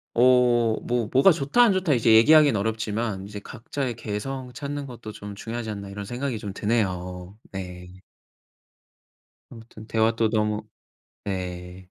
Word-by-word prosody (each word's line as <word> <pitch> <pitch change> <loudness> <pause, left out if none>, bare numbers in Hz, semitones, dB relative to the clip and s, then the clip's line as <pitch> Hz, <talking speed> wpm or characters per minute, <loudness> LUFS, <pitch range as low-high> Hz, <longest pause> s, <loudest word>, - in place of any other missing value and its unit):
어 120 -2 +4
뭐 120 -3 0
뭐가 135 +9 +7
"좋다. 150 - +2
안 235 -4 +6
좋다." 185 -6 +1
이제 115 -2 +4
얘기하긴 145 +3 +7
어렵지만 110 -1 -2
이제 105 0 -7
'각자의 125 +3 -5
개성 125 +4 -5
찾는 145 +1 -5
것도 120 -3 -9
좀 100 -1 -9
중요하지 115 +1 -5
않나.' 100 -2 -6
이런 100 0 -6
생각이 120 +1 -3
좀 105 -2 -6
드네요. 90 -3 -2
네. 90 -1 -8 1.5
아무튼 115 -2 -12
대화 110 0 +2
또 115 -1 +2
너무 105 -1 0 0.6
예. 90 -1 -5
110 Hz, 280 characters per minute, -25 LUFS, 100-125 Hz, 1.5 s, 뭐가